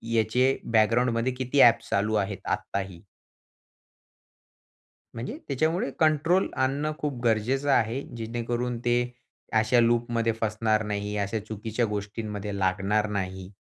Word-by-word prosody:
याचे 125 +4 +2 0.2
बॅकग्राऊंडमध्ये 115 +2 +3
किती 130 +2 +1
ॲप्स 115 -1 +5
चालू 105 +2 +1
आहेत 100 -2 -1
आत्ताही. 95 -3 -3 2.1
म्हणजे 115 +2 -5
त्याच्यामुळे 155 +4 0
कंट्रोल 160 +4 +3
आणणं 140 +4 0
खूप 145 -4 -3
गरजेचं 120 +5 +1
आहे. 115 +1 +2
जेणेकरून, 120 +1 -3
ते 120 +1 +1 0.5
अशा 115 +3 +3
लूपमध्ये 115 0 +2
फसणार 110 0 +1
नाही, 105 0 -3
अशा 100 +2 -1
चुकीच्या 110 +2 -2
गोष्टींमध्ये 105 -1 -4
लागणार 100 +3 +1
नाही. 95 -2 -4
115 Hz, 110 wpm, -26 LUFS, 105-125 Hz, 2.1 s, ॲप्स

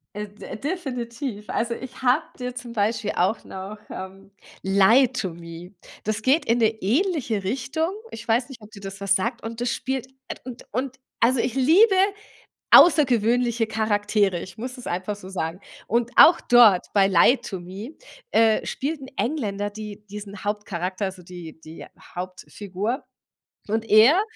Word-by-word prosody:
Äh, 210 0 -4
d 205 +1 -9
definitiv. 250 - -5
Also, 235 0 -1
ich 260 +1 -10
habe 260 +5 +3
dir 250 -1 -5
zum 245 -1 -8
Beispiel 220 0 0
auch 185 +5 +1
noch 190 +3 -8
ähm, 190 +1 -9 0.3
„Lie 200 +7 +5
to 220 -7 -3
Me“. 170 +2 -10 0.3
Das 215 +1 -2
geht 280 +6 +3
in 230 +1 +2
'ne 225 -2 +4
ähnliche 245 - 0
Richtung. 275 - -1 0.2
Ich 225 0 -9
weiß 240 +2 +1
nicht, 270 -4 -11
ob 210 0 -14
dir 205 - -12
das 195 0 -8
was 195 -1 +2
sagt 230 +6 -2
und 225 +1 -6
das 245 0 0
spielt 265 -1 -3 0.2
at - - -6
und 250 -2 -9
und 260 +3 -3 0.2
also 250 +3 +3
ich 235 - -1
liebe 340 - +5 0.8
außergewöhnliche 240 -6 +5
Charaktere. 205 -4 +1
Ich 185 - -10
muss 250 +3 -6
es 250 - -10
einfach 185 +4 -3
so 200 -2 -12
sagen. 175 -2 -4 0.3
Und 235 +2 0
auch 340 +1 +8
dort, 230 -7 +5
bei 195 -2 +4
„Lie 195 +7 +5
to 195 -6 -6
Me“, 195 - -8 0.4
äh, 225 -1 +3
spielt 295 +3 -3
'n 265 - -9
Engländer 205 -7 -2
die 210 0 -9
diesen 205 -1 -8
Hauptcharakter, 200 -2 -3
also 190 -1 -5
die 175 -3 -10
die 160 0 -11 0.3
Hauptfigur 190 - -5 0.6
und 220 +2 -1
er 240 - +7
220 Hz, 165 wpm, -24 LUFS, 195-250 Hz, 0.8 s, auch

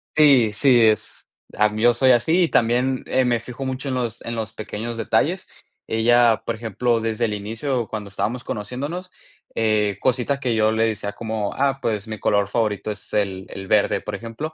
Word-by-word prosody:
Sí, 135 -8 +5
sí, 125 +1 +4
es 110 -1 +1 0.3
a 105 - +4
mí 105 +1 -5
yo 120 0 +6
soy 130 +2 +4
así 145 +9 +3
y 170 - +1
también, 125 +3 +1
eh, 130 - +2
me 120 -1 +1
fijo 125 +3 -8
mucho 130 +1 -4
en 130 - -1
los 120 -3 -3
en 115 - -4
los 110 -1 -4
pequeños 110 +2 -5
detalles. 115 - 0 0.4
Ella, 115 0 +3
por 115 - -2
ejemplo, 115 +1 -1
desde 115 +1 -1
el 105 - -2
inicio, 115 +4 -3
cuando 105 -2 -6
estábamos 115 +5 -3
conociéndonos, 145 - -5 0.5
eh, 105 -3 +1
cositas 130 +2 0
que 125 -4 -1
yo 110 0 +3
le 110 +1 +2
decía, 105 -2 -3
como: 110 -1 -3
"Ah, 135 0 0
pues 105 -5 -2
mi 110 -1 -6
color 100 -1 +1
favorito 105 -1 -1
es 105 - -9
el 95 -2 -1
el 95 0 -8
verde, 105 +1 +2
por 105 - -6
ejemplo". 115 +9 -6
115 Hz, 195 wpm, -22 LUFS, 105-125 Hz, 0.5 s, yo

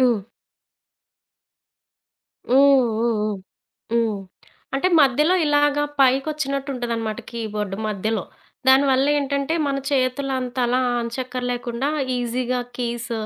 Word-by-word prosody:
హ్మ్. 245 -3 +4 2.3
హ్మ్, 255 - +4 0.4
హ్మ్ 230 -1 +1 0.8
హ్మ్, 235 0 +3
హ్మ్. 205 - -4 0.6
అంటే, 275 +7 +2
మధ్యలో 295 +5 +4
ఇలాగ 290 0 +3 0.2
పైకొచ్చినట్టు 275 +1 +1
ఉంటదనమాట 230 -3 -3
కీబోర్డ్ 210 -4 -4
మధ్యలో. 215 0 -1 0.5
దానివల్ల 265 0 +5
ఏంటంటే 280 +2 -1
మన 275 -1 0
చేతులంతలా 255 -2 0 0.2
అచక్కర్లేకుండా 245 +1 -3 0.3
ఈజీగా 245 +1 -1 0.2
కీస్, 240 0 -3
255 Hz, 85 wpm, -22 LUFS, 235-275 Hz, 2.3 s, దానివల్ల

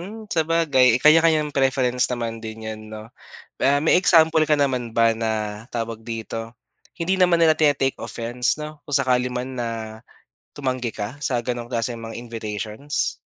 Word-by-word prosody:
Mm, 205 +6 -8 0.2
sabagay 160 -5 +3 0.2
kanya-kanyang 155 -1 +5
preference 130 -2 +2
naman 115 -2 -2
din 110 0 -7
'yan, 110 0 -6
'no. 110 0 -8 0.6
Ah, 140 +1 +4
may - - +4
example 160 -3 +5
ka 150 - +5
naman 130 -3 0
ba 115 0 +5 0.2
na, 110 -1 +1 0.4
tawag 115 -1 -3
dito, 115 0 -5 0.6
hindi 175 +3 0
naman 180 -2 +4
nila 160 -1 +6
tine-take 145 -3 +2
offense, 120 +2 -3
'no, 150 - -4 0.2
kung 145 - +1
sakali 125 -1 +1
man 125 +1 -3
na 120 - -2 0.9
tumanggi 130 -4 -2
ka 105 - -2 0.2
sa 130 - -1
ganong 120 -1 -4
klaseng 115 0 -2
mga 115 - -7
invitations? 110 +3 -4
125 Hz, 155 wpm, -22 LUFS, 115-150 Hz, 0.9 s, nila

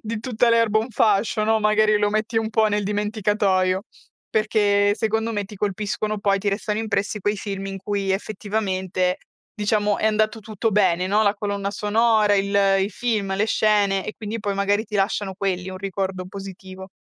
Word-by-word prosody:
di 225 0 -4
tutta 235 0 +1
l'erba 230 -2 +3
un 225 - -5
fascio, 215 -2 +2
no, 220 0 +2
magari 215 0 +3
lo 205 0 +1
metti 215 +2 0
un 220 -1 -2
po' 220 0 +3
nel 210 -1 0
dimenticatoio, 205 -2 0 0.4
perché 205 -2 +2
secondo 220 +1 -1
me 205 -2 -2
ti 210 +2 -11
colpiscono 210 +1 -2
poi, 200 -1 +1
ti 205 - -1
restano 210 +2 -1
impressi 210 -1 -2
quei 205 +2 0
film 195 -1 -5
in 195 0 -5
cui 200 0 -2
effettivamente, 190 -3 -1 0.4
diciamo, 210 -1 +1
è - - +1
andato 215 0 +1
tutto 215 +1 -2
bene, 185 -3 +2
no? 205 +3 +2
La 205 -1 +2
colonna 200 -1 -3
sonora, 210 +1 +2
il 200 0 0 0.3
i 195 - -2
film, 215 -3 -1
le 210 +2 +1
scene 205 -3 +2
e 215 - -5
quindi 220 +1 -5
poi 200 -1 -2
magari 200 +1 +1
ti 210 -1 -4
lasciano 195 0 -1
quelli, 185 -1 -2
un 185 - -7
ricordo 190 -1 -3
positivo. 190 0 -9
205 Hz, 180 wpm, -22 LUFS, 195-215 Hz, 0.4 s, l'erba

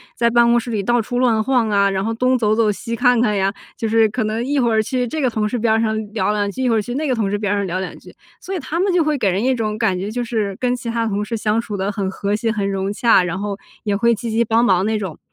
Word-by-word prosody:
在 235 0 +2
办 235 0 +4
公 235 0 +4
室 235 0 -3
里 215 -3 -1
到 240 +4 +1
处 245 +3 -3
乱 230 -4 +2
晃 245 -3 +1
啊， 200 -1 +3
然 195 0 -1
后 225 - -1
东 255 +3 +2
走 215 -3 +1
走 220 -2 +3
西 230 +3 -5
看 245 0 +3
看 210 -4 +1
呀， 195 0 +1 0.2
就 225 -3 -2
是 225 0 +4
可 225 +2 -2
能 215 +2 -2
一 285 +2 -1
会 240 -4 +2
儿 220 -1 +3
去 250 +3 -1
这 280 +7 -4
个 260 - +2
同 215 -2 -1
事 245 - -2
边 220 0 +2
儿 225 - +2
上 220 -1 0 0.2
聊 215 -2 0
两 205 -1 0
句， 260 +6 -4
一 255 - +2
会 225 - +3
儿 - - +2
去 240 +4 -6
那 305 +3 -1
个 265 - +1
同 220 -5 0
事 205 - -1
边 205 -1 -2
儿 - - 0
上 200 -1 -1
聊 185 +1 -2
两 185 - -6
句。 180 - -15 0.2
所 385 - -5
以 - - -2
他 305 +4 -4
们 380 0 +1
就 350 -2 +3
会 305 -1 0
给 215 -7 +1
人 190 +4 0
一 260 +1 +2
种 215 -3 -2
感 185 -3 0
觉， 195 +3 -3
就 245 +3 -3
是 215 -4 -2
跟 250 -1 +1
其 235 -1 -6
他 230 0 -1
同 205 0 -2
事 230 - -3
相 215 0 0
处 225 -3 -4
得 195 +1 -1
很 200 -2 -2
和 200 +1 -3
谐、 225 +2 -1
很 205 -2 -1
融 195 +1 -2
洽， 230 -3 +4
然 180 +1 -3
后 200 0 -3 0.3
也 205 -2 0
会 235 +2 +3
积 230 +1 -5
极 230 +2 +2
帮 230 +1 +2
忙 190 -4 +3
那 220 0 0
种。 190 -7 -5
220 Hz, 350 characters per minute, -19 LUFS, 205-240 Hz, 0.3 s, 办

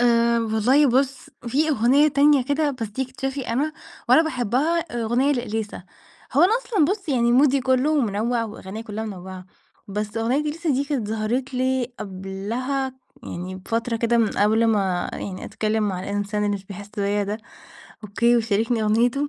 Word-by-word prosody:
آآ، 235 -1 +3
والله 230 +6 +3
بُص 265 0 0 0.2
في 300 +6 +1
أغنية 275 +3 +4
تانية 285 -1 +4
كده 290 +2 +1
بس 235 -5 -5
دي 260 +6 -3
اكتشافي 265 0 -4
أنا، 285 +7 0 0.4
وأنا 320 - +7
باحبّها 270 +3 0
أغنية 240 -1 0
لإليسا. 220 -6 -3 0.5
هو 285 +6 +4
أنا 380 +5 +5
أصلًا 425 -10 +2
بُص 385 +1 -2
يعني 240 -3 +2
مودي 275 +1 +4
كلّه 265 +4 +2
منوّع 230 +1 0
وأغانيّا 215 -1 -7
كلّها 220 0 -5
منوعّة. 185 -2 -8 0.4
بس 210 +2 -4
أغنية 240 +6 +1
إليسا 310 +2 -2
دي 275 +1 +1
كانت 265 -8 -2
ظهرت 235 +5 -2
لي 255 -1 0
قبلها 210 +8 -3 0.3
يعني 180 +2 -6
بفترة 230 +4 -2
كده 235 +1 +1
من 220 -2 +3
قبل 220 +3 +2
ما 195 -5 +1
يعني 185 -2 -6
أتكلّم 215 0 -1
مع 185 -2 -3
الإنسان 205 +1 -2
اللي 205 0 +1
مش 195 - -12
بيحس 200 +1 -9
بيّا 205 0 0
ده، 210 +2 -3 0.7
okay 205 +3 -10
ويشاركني 230 -1 +2
أغنيته. 240 +7 +2
235 Hz, 160 wpm, -23 LUFS, 210-270 Hz, 0.7 s, وأنا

